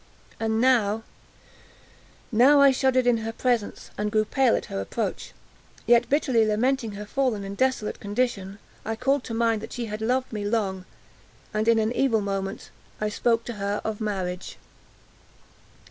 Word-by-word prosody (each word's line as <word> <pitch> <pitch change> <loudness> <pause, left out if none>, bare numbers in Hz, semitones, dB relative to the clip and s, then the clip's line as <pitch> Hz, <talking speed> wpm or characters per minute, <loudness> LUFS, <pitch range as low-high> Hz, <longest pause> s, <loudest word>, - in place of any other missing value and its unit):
And 220 0 0
now—now 240 +2 0
I 280 -1 +7
shuddered 260 -1 +2
in 245 -1 +4
her 225 0 -4
presence, 235 -2 -2
and 210 0 -1
grew 215 0 +2
pale 260 +2 +2
at - - -3
her 95 - -4
approach; 95 - -4 0.5
yet, 240 0 +4
bitterly 265 -5 +3
lamenting 225 +1 0
her 205 +1 -7
fallen 240 -3 -1
and 195 0 -6
desolate 260 -3 0
condition, 205 -2 -2 0.3
I 225 - -3
called 275 +3 +1
to 230 - -4
mind 225 -2 +1
that - - -8
she 240 - -3
had 215 0 -6
loved 255 +2 0
me 210 -1 -3
long, 200 -3 -1 0.7
and, 215 +1 0
in 230 -1 +5
an 220 0 +1
evil 245 -3 +2
moment, 195 +1 -4 0.3
I 215 - 0
spoke 230 +2 +1
to 240 - -5
her 200 +1 -1
of 220 0 -4
marriage. 185 -4 -3
225 Hz, 160 wpm, -25 LUFS, 210-245 Hz, 0.7 s, I